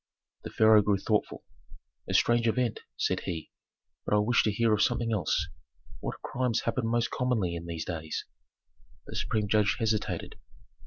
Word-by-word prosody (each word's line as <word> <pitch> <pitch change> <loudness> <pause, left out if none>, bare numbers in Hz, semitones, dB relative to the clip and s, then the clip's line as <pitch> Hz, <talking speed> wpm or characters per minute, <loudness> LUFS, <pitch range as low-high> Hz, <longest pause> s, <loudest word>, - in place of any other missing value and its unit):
The - - -6
pharaoh 110 -1 +6
grew 100 -1 +2
thoughtful. 105 +2 -1 0.7
"A - - 0
strange 120 0 +3
event," 120 0 0 0.2
said - - 0
he, 80 -3 -5 0.5
"but - - +1
I - - +5
wish 110 +4 +3
to 110 - +2
hear 115 +2 +2
of 105 - +2
something 115 -1 +1
else. 90 -7 0 0.5
What - - -6
crimes 125 -3 0
happen 115 0 -1
most 120 0 0
commonly 115 -9 0
in 85 0 -6
these 85 -2 -4
days?" 80 -3 -4 0.8
The - - -9
supreme 105 -1 -1
judge 105 -1 +3
hesitated. 110 -6 -2
110 Hz, 160 wpm, -29 LUFS, 100-115 Hz, 0.8 s, pharaoh